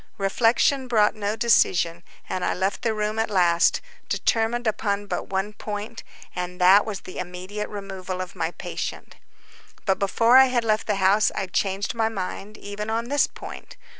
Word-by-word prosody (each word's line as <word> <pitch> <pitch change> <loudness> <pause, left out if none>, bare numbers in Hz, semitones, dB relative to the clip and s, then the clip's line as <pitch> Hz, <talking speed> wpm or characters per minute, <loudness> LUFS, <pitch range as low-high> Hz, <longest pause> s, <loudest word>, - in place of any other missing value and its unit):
Reflection 235 +6 +2
brought 215 -4 +3
no 210 0 -2
decision, 175 -7 +2 0.3
and 185 - -3
I - - 0
left 190 +2 -1
the 225 -2 0
room 215 +1 -1
at 225 - 0
last, 175 -3 +3 0.3
determined 235 +2 0
upon 205 -2 -1
but - - -4
one 195 +2 -2
point, 210 +2 -6 0.3
and 180 0 -4
that 190 +4 +6
was 205 -3 -4
the 185 - -8
immediate 185 +4 -5
removal 190 -2 -6
of 185 0 -6
my 165 -2 -1
patient. - - -6 0.7
But 190 -2 +1
before 230 +5 +4
I 265 - +9
had 250 -2 0
left 215 -1 0
the 210 - +1
house 195 +2 +3
I 195 - -1
changed 195 +1 -1
my 225 -1 +1
mind 200 0 -6
even 205 +1 -6
on 230 +2 -2
this 285 0 +3
point. - - -10
205 Hz, 170 wpm, -24 LUFS, 190-225 Hz, 0.7 s, I